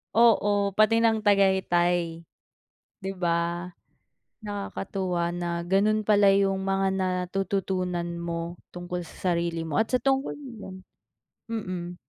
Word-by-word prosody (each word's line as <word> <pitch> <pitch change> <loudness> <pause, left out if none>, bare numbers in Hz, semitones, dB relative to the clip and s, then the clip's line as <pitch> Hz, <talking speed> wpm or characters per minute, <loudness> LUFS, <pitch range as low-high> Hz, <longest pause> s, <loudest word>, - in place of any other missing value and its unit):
Oo, 205 -3 +4
pati 225 +2 +4
ng 225 -1 +3
Tagaytay, 175 -4 +2 0.8
'di 190 0 -3
ba? 170 0 0 0.7
Nakakatuwa 195 -4 -3
na 170 -1 -3
ganun 210 +3 +2
pala 205 -2 +5
yung 195 -1 +2
mga 195 0 +1
natututunan 185 -1 -1 0.2
mo 170 0 -4 0.2
tungkol 175 0 -5
sa 175 +1 -2
sarili 170 -1 -2
mo 155 - -5
at 225 - -10
sa 255 - +3
tungkol 270 +2 0
din 270 -4 -10
do'n. 185 - -8 0.7
Mm. 185 -6 -4
190 Hz, 120 wpm, -26 LUFS, 175-205 Hz, 0.8 s, pala